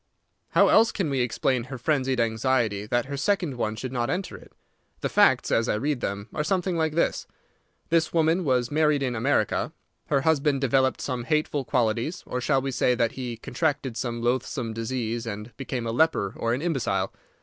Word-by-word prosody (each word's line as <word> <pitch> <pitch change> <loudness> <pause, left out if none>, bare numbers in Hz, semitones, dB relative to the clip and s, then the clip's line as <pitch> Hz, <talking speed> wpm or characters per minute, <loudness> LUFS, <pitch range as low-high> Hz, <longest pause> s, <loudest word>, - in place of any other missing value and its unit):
"How - - +5
else 225 +1 +5
can 175 -8 -2
we 135 - 0
explain 125 +1 0
her 130 0 -7
frenzied 130 -1 0
anxiety 110 -2 +1
that 120 +2 +1
her 140 +1 -5
second 175 -2 0
one 110 -2 -2
should 130 +3 -5
not 120 -1 -1
enter 180 +5 -3
it? - - -14 0.5
The - - -1
facts, - - +4
as 115 +1 +2
I - - +2
read 140 +3 -1
them, 100 +1 -3
are 150 - -1
something 185 +1 0
like 160 -2 0
this: 170 - 0 0.6
This 165 -1 +2
woman 165 +2 +2
was 125 -5 +1
married 150 -2 +2
in 125 -2 -1
America. 115 -2 0 0.3
Her 140 -2 +2
husband 145 -2 +2
developed 130 0 +2
some 125 -3 -3
hateful 150 -1 0
qualities; 120 +6 0
or 125 - -3
shall 135 +2 +1
we 135 - -2
say 125 0 +2
that 115 -1 +1
he 125 -3 -5
contracted 135 0 -2
some 120 -1 -3
loathsome 120 -1 -1
disease, 115 0 -3
and 105 +2 -6
became 130 -3 -4
a 115 - -1
leper 120 -7 +2
or 115 +1 0
an 135 - -5
imbecile? 165 -7 -1
130 Hz, 190 wpm, -26 LUFS, 115-150 Hz, 0.6 s, How